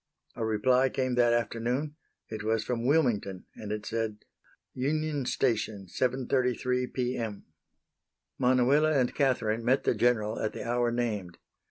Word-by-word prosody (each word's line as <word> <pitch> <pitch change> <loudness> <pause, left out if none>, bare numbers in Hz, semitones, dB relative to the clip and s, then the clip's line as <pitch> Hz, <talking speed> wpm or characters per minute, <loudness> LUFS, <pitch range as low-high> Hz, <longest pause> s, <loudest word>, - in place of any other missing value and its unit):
A - - -3
reply 125 +4 +3
came 130 -1 -1
that 120 -1 +4
afternoon. 120 +5 -1 0.3
It 110 -1 -6
was 110 0 0
from 120 0 -2
Wilmington, 120 - +1
and 105 -1 -7
it 105 0 -4
said: 110 -2 -3 0.5
"Union 145 0 -1
Station, 110 -5 0
7.33 125 +2 0
P. 125 0 -1
M." 110 -3 -5 0.9
Manuela 130 +5 +4
and 130 -4 +2
Catherine 115 -5 +1
met 130 +3 +2
the - - +2
General 110 -1 +1
at 110 - -2
the - - -6
hour 120 0 +1
named. 105 -7 -2
120 Hz, 140 wpm, -29 LUFS, 110-130 Hz, 0.9 s, that